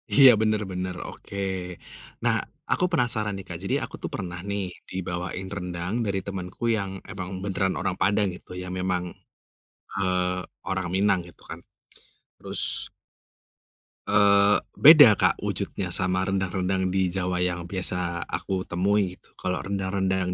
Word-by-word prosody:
Iya, 135 Hz, -1 st, +10 dB
bener 110 Hz, -1 st, +2 dB
bener 90 Hz, 0 st, -3 dB
oke. 100 Hz, -, -10 dB, 0.9 s
Nah, -, -, +3 dB, 0.4 s
aku 180 Hz, -, +3 dB
penasaran 115 Hz, -, 0 dB
nih, 95 Hz, -, -8 dB
Kak, 85 Hz, -, -5 dB
jadi 95 Hz, -, 0 dB
aku -, -, -6 dB
tuh -, -, -2 dB
pernah 90 Hz, -1 st, -5 dB
nih 100 Hz, 0 st, -1 dB, 0.3 s
dibawain 90 Hz, 0 st, -4 dB
rendang 90 Hz, +1 st, -4 dB
dari 100 Hz, -2 st, 0 dB
temanku 95 Hz, +1 st, -6 dB
yang 100 Hz, -2 st, -3 dB, 0.2 s
emang 95 Hz, -2 st, -5 dB
beneran 95 Hz, -1 st, 0 dB
orang 95 Hz, -, -1 dB
Padang 100 Hz, +2 st, +3 dB
gitu -, -, -15 dB
yang 90 Hz, 0 st, -6 dB
memang, 90 Hz, -1 st, 0 dB, 1.0 s
eee, 90 Hz, -1 st, 0 dB, 0.3 s
orang 95 Hz, -1 st, -1 dB
Minang 100 Hz, -1 st, +3 dB
gitu 90 Hz, -, -17 dB
kan. -, -, -6 dB, 0.8 s
Terus -, -, -6 dB, 1.5 s
eee, 100 Hz, 0 st, +6 dB, 0.2 s
beda, 145 Hz, -6 st, +10 dB
Kak, -, -, +2 dB
wujudnya -, -, -2 dB
sama 95 Hz, 0 st, +1 dB
rendang-rendang 95 Hz, -1 st, 0 dB
di 95 Hz, -1 st, 0 dB
Jawa 90 Hz, -1 st, -1 dB
yang 90 Hz, -1 st, -1 dB
biasa 90 Hz, -2 st, -1 dB
aku 95 Hz, -1 st, -3 dB
temui 95 Hz, +1 st, +1 dB
gitu. -, -, -20 dB
Kalau 90 Hz, -1 st, -2 dB
rendang-rendang 95 Hz, -1 st, -1 dB
95 Hz, 140 wpm, -26 LUFS, 90-100 Hz, 1.5 s, Iya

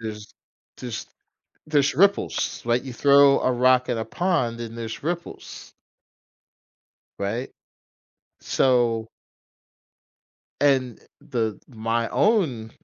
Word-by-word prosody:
There's 105 Hz, -2 st, -8 dB, 0.4 s
there's 120 Hz, -3 st, -6 dB, 0.6 s
there's 145 Hz, -2 st, +2 dB
ripples, 200 Hz, +3 st, +1 dB
like 120 Hz, +2 st, 0 dB
you 130 Hz, -, -7 dB
throw 140 Hz, +2 st, +5 dB
a 130 Hz, -, +1 dB
rock 125 Hz, +1 st, +3 dB
in 120 Hz, -2 st, -1 dB
a 110 Hz, -, -2 dB
pond 125 Hz, -4 st, -1 dB
and 115 Hz, 0 st, -7 dB
there's 115 Hz, -1 st, -6 dB
ripples. 170 Hz, +3 st, -6 dB, 1.4 s
Right, 110 Hz, +6 st, -3 dB, 0.9 s
so 120 Hz, -3 st, +1 dB, 1.5 s
and, 130 Hz, -4 st, +1 dB
uh, -, -, -24 dB, 0.2 s
the 115 Hz, -6 st, -3 dB
my 115 Hz, -1 st, -2 dB
own 155 Hz, -, +1 dB
125 Hz, 105 wpm, -24 LUFS, 115-140 Hz, 1.5 s, throw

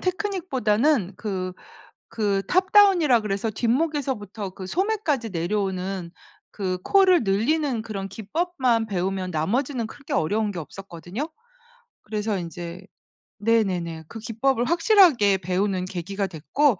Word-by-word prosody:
테크닉보다는 300 Hz, -, 0 dB
그 185 Hz, -4 st, -3 dB, 0.6 s
그 200 Hz, -3 st, 0 dB
탑다운이라고 370 Hz, -, +5 dB
그래서 210 Hz, +2 st, -2 dB
뒷목에서부터 235 Hz, -, -1 dB
그 185 Hz, 0 st, -9 dB
소매까지 345 Hz, -, 0 dB
내려오는 185 Hz, 0 st, -2 dB, 0.4 s
그 185 Hz, -3 st, -2 dB
코를 375 Hz, -7 st, +5 dB
늘리는 235 Hz, +5 st, +1 dB
그런 200 Hz, -3 st, -5 dB
기법만 240 Hz, -, 0 dB
배우면 190 Hz, -2 st, -2 dB
나머지는 230 Hz, -, -1 dB
그렇게 275 Hz, +4 st, -12 dB
어려운 205 Hz, +6 st, +1 dB
게 175 Hz, -, -5 dB
없었거든요. 190 Hz, -, -7 dB, 0.7 s
그래서 210 Hz, -1 st, -2 dB
인제 175 Hz, +1 st, -7 dB, 0.5 s
네네네. 185 Hz, -7 st, 0 dB
그 225 Hz, -, -8 dB
기법을 235 Hz, +3 st, 0 dB
확실하게 330 Hz, -, +5 dB
배우는 185 Hz, +1 st, -1 dB
계기가 190 Hz, +2 st, -3 dB
됐고 195 Hz, -, +1 dB
215 Hz, 305 characters per minute, -24 LUFS, 190-275 Hz, 0.7 s, 탑다운이라고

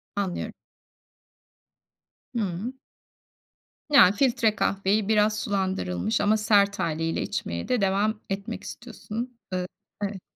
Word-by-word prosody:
Anlıyorum. 195 Hz, -3 st, -2 dB, 1.8 s
Hımm. 210 Hz, +2 st, -2 dB, 1.1 s
Ya, 280 Hz, -11 st, +8 dB
filtre 230 Hz, -1 st, +2 dB
kahveyi 200 Hz, +1 st, +1 dB
biraz 210 Hz, -1 st, +3 dB
sulandırılmış 115 Hz, -, -1 dB
ama 210 Hz, +1 st, +3 dB
sert 205 Hz, -1 st, +3 dB
hâliyle 165 Hz, +1 st, -1 dB
içmeye 85 Hz, 0 st, -3 dB
de 245 Hz, -4 st, +1 dB
devam 205 Hz, +3 st, +1 dB
etmek 200 Hz, +4 st, -4 dB
istiyorsun, 240 Hz, 0 st, -7 dB, 0.2 s
ııı, 180 Hz, 0 st, -1 dB, 0.4 s
evet. 195 Hz, -2 st, -3 dB
205 Hz, 100 wpm, -26 LUFS, 190-220 Hz, 1.8 s, Ya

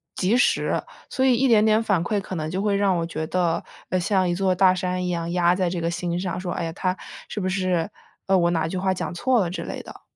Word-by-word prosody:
及 205 Hz, +7 st, +2 dB
时， -, -, +2 dB, 0.3 s
所 260 Hz, -, 0 dB
以 255 Hz, -2 st, +5 dB
一 265 Hz, +2 st, +2 dB
点 215 Hz, -1 st, +5 dB
点 220 Hz, +1 st, +3 dB
反 195 Hz, -6 st, +1 dB
馈 205 Hz, 0 st, 0 dB
可 190 Hz, -, -6 dB
能 155 Hz, -1 st, -3 dB
就 185 Hz, +3 st, -2 dB
会 205 Hz, -1 st, +1 dB
让 195 Hz, -2 st, +2 dB
我 165 Hz, -, -1 dB
觉 160 Hz, -1 st, -4 dB
得， 175 Hz, -2 st, 0 dB, 0.3 s
呃， 185 Hz, -, +1 dB
像 185 Hz, 0 st, +1 dB
一 -, -, +1 dB
座 185 Hz, 0 st, +1 dB
大 185 Hz, 0 st, +5 dB
山 180 Hz, 0 st, -2 dB
一 -, -, -1 dB
样 170 Hz, -1 st, -2 dB
压 175 Hz, 0 st, +3 dB
在 180 Hz, -1 st, 0 dB
这 175 Hz, -1 st, -3 dB
个 170 Hz, +1 st, -1 dB
心 175 Hz, 0 st, -2 dB
上， 180 Hz, -1 st, -3 dB
说， 180 Hz, -1 st, -3 dB
哎 175 Hz, -, -3 dB
呀， 165 Hz, -, -3 dB
他 185 Hz, +2 st, -1 dB, 0.3 s
是 210 Hz, -, -4 dB
不 185 Hz, -, -1 dB
是， 185 Hz, -3 st, 0 dB, 0.4 s
呃， 195 Hz, -1 st, +4 dB
我 170 Hz, -1 st, +3 dB
哪 160 Hz, -1 st, 0 dB
句 185 Hz, -, -3 dB
话 190 Hz, 0 st, +1 dB
讲 180 Hz, -, -4 dB
错 245 Hz, +5 st, +2 dB
了 175 Hz, -, -1 dB
之 180 Hz, -, -5 dB
类 -, -, -6 dB
的。 -, -, -12 dB
185 Hz, 290 characters per minute, -24 LUFS, 175-195 Hz, 0.4 s, 以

